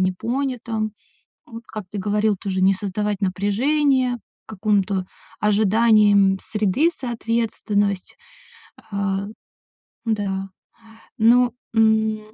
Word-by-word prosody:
непонятым. 225 +2 -2 0.5
Вот, 230 0 -10
как 215 -2 -7
ты 210 - -5
говорил, 210 +1 +1
тоже 190 -2 -2
не 190 +1 +5
создавать 205 +1 -2
напряжение, 250 +7 +1 0.3
к - - -13
какому-то 195 -2 +1 0.4
ожиданиям 210 -2 +4
среды, 215 - +1
соответственность, 225 - -2 0.8
а. 200 0 -1 0.8
Да, 195 -3 -2 0.7
ну, 240 +2 +4 0.2
м, 220 -1 +3
210 Hz, 90 wpm, -22 LUFS, 200-230 Hz, 0.8 s, не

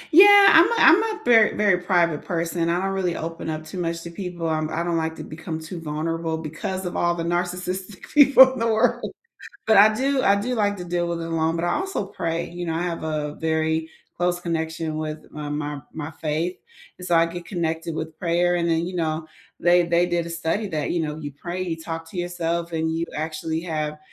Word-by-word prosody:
Yeah, 405 +2 +9
I'm 330 +7 +6
a - - +1
I'm 355 +3 +7
a 420 - -13
very 225 -3 +5
very 205 -4 +3
private 170 -4 +1
person, 170 -1 -1
I 170 +1 +1
don't 195 +1 -1
really 185 -3 -1
open 165 0 -5
up 155 0 -4
too 180 +4 -7
much 165 -1 -2
to 170 - -8
people, 175 -2 -5
um, 155 -1 -1
I 165 +2 -1
don't 175 -1 -1
like 160 0 -1
to - - -8
become 160 0 -6
too 165 +2 -8
vulnerable 160 +1 -3
because 160 +4 -5
of 175 - -4
all 175 0 +1
the 165 - -3
narcissistic 180 +2 -3
people 270 -3 +8
in 255 - -6
the 230 - +1
world, 220 -1 +1 0.6
but 220 -2 +5
I 215 +2 +7
do 270 +3 +1
I 200 - +4
do 245 +5 -2
like 205 -3 +1
to 180 - -7
deal 175 0 -1
with 170 -1 -3
it - - -4
alone, 165 0 0
but 165 - -2
I 175 - +1
also 385 - -2
pray, 170 -3 -3
you 175 0 -6
know, 165 - -2
I 165 - -1
have 170 -2 -3
a 150 -2 -2
very 160 0 -1 0.3
close 175 0 +1
connection 160 -2 -3
with 155 0 -5
my 150 -1 -6
my 145 -1 -4
my, 160 -1 -5
faith 160 +3 -3 0.4
and 180 - -8
so 175 - +1
I 165 0 +5
get 175 +1 -7
connected 165 -3 -3
with 160 0 -6
prayer 175 +1 +1
and 170 0 0
then 165 +1 +1
you 180 - -6
know, 160 -1 -2 0.3
they 175 0 +4
they 170 +1 +3
did 175 -1 -1
a 170 - -7
study 170 +5 -2
that, 155 -4 -2
you 175 - 0
know, 150 -1 -3
you 145 -2 -7
pray, 175 +6 -5
you 170 -3 -3
talk 165 0 -6
to 180 - -7
yourself 170 -1 -2
and 160 0 -1
you 165 +1 -2
actually 160 +1 -3
have 155 -3 -3
170 Hz, 230 wpm, -23 LUFS, 160-180 Hz, 0.6 s, Yeah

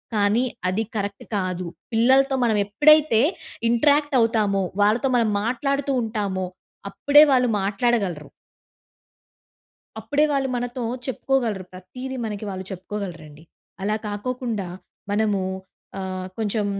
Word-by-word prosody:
కానీ 210 +3 +3 0.3
అది 200 +4 0
కరెక్ట్ 200 -1 -4
కాదు. 185 -1 -2 0.3
పిల్లలతో 265 +4 +4
మనం 225 -3 +2
ఎప్పుడైతే 295 +2 +5 0.5
ఇంట్రాక్ట్ 290 +4 +3
అవుతామో, 210 -4 +2 0.2
వాళ్ళతో 225 +6 +2
మనం 230 -2 +2
మాట్లాడుతూ 275 +4 -1
ఉంటామో 205 -4 -2 0.5
అప్పుడే 290 +1 +6
వాళ్ళు 250 -1 +4
మాట్లాడగలరు. 195 -5 0 1.7
అప్పుడే 295 +1 +1
వాళ్ళు 275 -1 +1
మనతో 245 0 -3 0.2
చెప్పుకోగలరు. 235 -5 -1
ప్రతీది 250 +9 -7
మనకి 210 -1 -5
వాళ్ళు 190 -1 -6
చెప్పుకోగలరండి. 175 -6 -7 0.4
అలా 210 +2 0
కాకోకుండా 220 -1 -3 0.4
మనము 205 -1 +1 0.6
ఆహ్, 185 -1 -4
కొంచెం 215 -1 0
220 Hz, 105 wpm, -23 LUFS, 195-255 Hz, 1.7 s, అప్పుడే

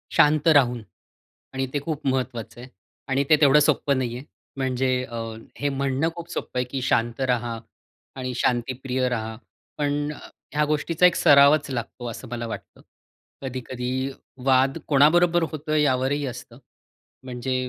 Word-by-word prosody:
शांत 150 +1 +4
राहून 125 -6 +4 0.7
आणि 135 0 -1
ते 145 - +1
खूप 150 -1 -5
महत्त्वाचं 125 -3 -2
आहे 130 - -11 0.4
आणि 135 +1 +1
ते 155 - +8
तेवढं 145 0 +7
सोप्पं 140 -1 +2
नाहीये. 125 0 -3 0.3
म्हणजे 130 -1 0 0.2
अ, 115 -1 -7 0.4
हे 145 0 0
म्हणणं 140 +3 0
खूप 170 0 -8
सोप्पं 125 - -4
आहे, 125 - 0
की 135 - -2
शांत 120 0 0
राहा 120 -1 -2 0.6
आणि 130 -1 -4
शांतीप्रिय 125 +1 -1
राहा, 110 -2 -3 0.4
पण 145 0 -1
अ, - - -12 0.3
ह्या 150 +1 +2
गोष्टीचा 155 +3 +1
एक 180 -1 +5
सरावच 145 +1 +5
लागतो, 120 0 -5
असं 125 +3 -9
मला 120 -1 -4
वाटतं. 115 - -9 0.6
कधी-कधी 130 0 -3 0.3
वाद 135 0 +3
कोणाबरोबर 170 +4 +4
होतो, 155 0 -3
यावरही 145 -1 +1
असतं. 120 -1 -9 0.7
म्हणजे 130 0 -3
135 Hz, 145 wpm, -24 LUFS, 125-145 Hz, 0.7 s, ते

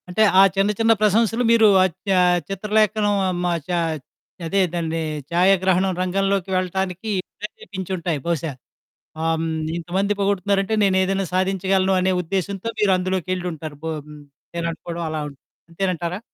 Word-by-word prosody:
అంటే 180 +5 0 0.2
ఆ - - +10
చిన్న 195 +2 +2
చిన్న 225 0 +4
ప్రశంసలు 225 +3 +3
మీరు 225 -2 +6 0.2
అద్ 185 -3 0 0.3
ఆహ్, 180 0 +4
చిత్రలేఖనం 210 +1 +1 0.3
మా 175 - +1 0.2
చ - - -21 0.8
అదే 195 +4 +1
దాన్ని 165 -1 -2 0.3
ఛాయాగ్రహణం 185 +1 +3
రంగంలోకి 195 +1 0
వెళ్ళటానికి 185 +2 -2 0.3
ప్రెరేపించుంటాయి 185 -5 -4
బహుశా. 165 -2 -1 0.7
ఆహ్, 165 0 +1
హ్మ్. - - -1 0.3
ఇంతమంది 190 +4 -1
పొగుడుతున్నారంటే 200 +1 +1
నేనేదైనా 190 0 +2
సాధించగలను 190 0 +1
అనే 185 +1 +2
ఉద్దేశ్యంతో 195 +4 -3
మీరందులోకెళ్ళుంటారు 180 -5 -1
బ - - -5 0.7
నేననుకోవడం 170 0 -4
అలా 155 0 -3 0.5
అంతేనంటారా? 175 0 -2
190 Hz, 115 wpm, -22 LUFS, 175-195 Hz, 0.8 s, ఆ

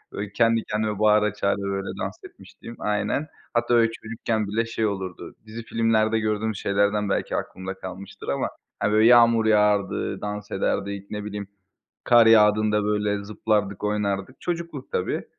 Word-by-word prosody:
Böyle, 100 0 -5
kendi 115 0 +3
kendime 105 -1 -2
bağıra 105 -1 +4
çağıra, 100 -1 0
böyle 100 0 -3
dans - - -3
etmişliğim 115 - -12
Aynen. 105 +8 -1 0.3
Hatta, 120 0 +2
böyle, 115 -1 +4
çocukken 110 -1 -3
bile 115 +3 0
şey 115 -1 -1
olurdu, 95 -3 -5
dizi 115 +2 -7
filmlerde 110 -1 +1
gördüğümüz 110 -1 -1
şeylerden 100 +1 +1
belki - - -1
aklımda 95 +1 -5
kalmıştır 95 +1 -9
ama, - - 0 0.3
hani, 105 +1 0
böyle 110 +1 +5
yağmur 115 -2 +6
yağardı, 105 -2 +2
dans 105 0 -5
ederdik, 100 +1 -2
ne 105 -1 -5
bileyim, 105 -1 -5 0.6
kar 120 -1 +6
yağdığında, 105 -1 +4
böyle, 105 -1 0
zıplardık, 105 -1 -1
oynardık. 105 +2 -2
Çocukluk 170 -6 -5
tabii. - - -1
105 Hz, 150 wpm, -24 LUFS, 100-115 Hz, 0.6 s, yağmur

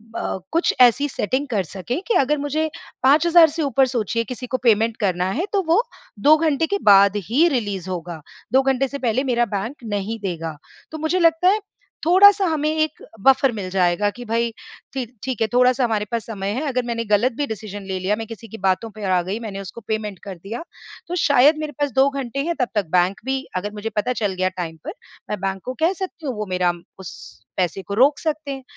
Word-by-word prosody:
अ, - - -2
कुछ 335 +2 +2
ऐसी 250 +4 +5
सेटिंग 260 +3 -2
कर 215 -7 0
सकें 195 - -5
कि 470 - +2
अगर 295 +2 +2
मुझे 300 +2 -1 0.3
5000 325 +5 +6
से 320 +2 -4
ऊपर 270 -1 +3
सोचिए 230 -2 -1
किसी 250 +2 -7
को 255 - -1
पेमेंट 225 -1 +3
करना 185 -3 0
है, 325 - -1
तो 400 - +3
वो 340 +7 +4 0.4
2 295 +8 +6
घंटे 315 -1 +1
के - - +3
बाद 200 0 +6
ही 295 +9 +4
रिलीज़ 205 - -2
होगा। 170 -3 -5 0.3
2 265 - +6
घंटे 270 0 +1
से 280 - -6
पहले 250 +2 0
मेरा 240 -2 +1
बैंक 225 +8 -3
नहीं 215 +1 -3
देगा। 165 -4 -4 0.3
तो 315 - -5
मुझे 315 +4 0
लगता 330 +1 +3
है, 420 - +3 0.5
थोड़ा-सा 390 +3 +6
हमें 310 -3 0
एक 310 -1 -1 0.2
बफर 270 0 +5
मिल 200 -5 -5
जाएगा 185 +2 +2
कि 245 - -8
भई 230 +1 0 0.4
ठी 265 -2 -2 0.2
ठीक 260 -4 -3
है, 225 - +3
थोड़ा-सा 250 +1 +4
हमारे 220 -3 0
पास 230 -2 -2
समय 200 -3 -4
है। 255 - -2
अगर 255 -2 0
मैंने 230 -1 -2
गलत 210 +4 +2
भी 290 - 0
डिसिज़न 205 -2 -6
ले 190 -1 -4
लिया, 190 +3 0
मैं 225 +1 -6
किसी 225 +1 -10
की 225 - -9
बातों 190 +4 +1
पे 215 - -8
आ 185 -2 +2
गई, 190 +5 -4
मैंने 210 -4 -6
उसको 195 +4 -9
पेमेंट 215 -3 -3
कर 195 -2 -7
दिया, 225 +8 -6 0.4
तो 350 - -3
शायद 285 +2 +5
मेरे 305 -1 -4
पास 290 -1 0
2 265 +3 +4
घंटे 275 -2 -4
हैं। 340 - 0
तब 250 - +2
तक 205 -2 +1
बैंक 180 +2 +2
भी 265 0 -1
अगर 195 +3 -2
मुझे 210 +1 -4
पता 230 +4 0
चल 205 -3 0
गया 185 0 0
टाइम 165 -3 -4
पर, - - -4 0.4
मैं 210 - -3
बैंक 195 -1 -2
को 255 - -3
कह 330 +4 +3
सकती 370 -3 -7
हूँ 260 -4 -2
वो 210 0 -3
मेरा 180 -1 +2 0.3
उस 185 - -8 0.5
पैसे 180 +1 -1
को 190 +2 -7
रोक 270 +7 +4
सकते 310 -2 -3
हैं। 270 -1 -6
235 Hz, 220 wpm, -21 LUFS, 200-285 Hz, 0.5 s, 5000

